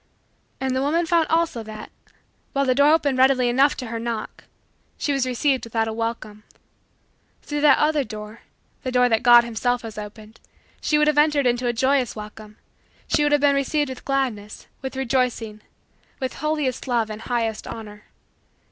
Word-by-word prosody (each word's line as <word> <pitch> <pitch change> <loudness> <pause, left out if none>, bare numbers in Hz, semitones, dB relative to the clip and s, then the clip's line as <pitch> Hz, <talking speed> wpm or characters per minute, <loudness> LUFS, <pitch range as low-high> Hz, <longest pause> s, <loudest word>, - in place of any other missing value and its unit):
And 265 -1 -1
the 260 - 0
woman 325 +5 +1
found 330 -1 +2
also 325 -7 0
that, 215 -1 -9 0.6
while 275 -1 +1
the 255 - +3
door 285 +3 +4
opened 285 -5 +2
readily 260 -2 +4
enough 270 +4 +3
to 255 - -5
her 230 0 -5
knock, 230 -2 -5 0.5
she 290 - -1
was 270 -2 0
received 260 +2 0
without 225 -1 -1
a 220 - -3
welcome. 225 -2 -4 1.0
Through 295 -1 -3
that 295 -2 +6
other 300 -1 +2
door, 215 -1 -9 0.4
the 255 - -4
door 250 0 +3
that 225 -1 +2
God 240 -1 +7
himself 240 +1 -1
has 220 -2 -7
opened, 215 +1 -11 0.4
she 300 - +2
would 300 - +4
have 300 -1 +3
entered 295 -2 +3
into 245 0 +1
a - - +2
joyous 260 +1 +1
welcome 215 0 -10 0.5
she - - +1
would 295 0 +2
have 295 -1 +3
been 285 -1 +4
received 285 +1 0
with 260 - -8
gladness, 250 -7 -3 0.2
with 265 -1 -6
rejoicing, 245 -4 -1 0.6
with 260 -2 -3
holiest 300 -5 -2
love, 230 -3 0
and 215 +1 -7
highest 230 -3 -2
honor. 210 -2 -9
250 Hz, 175 wpm, -23 LUFS, 225-280 Hz, 1.0 s, God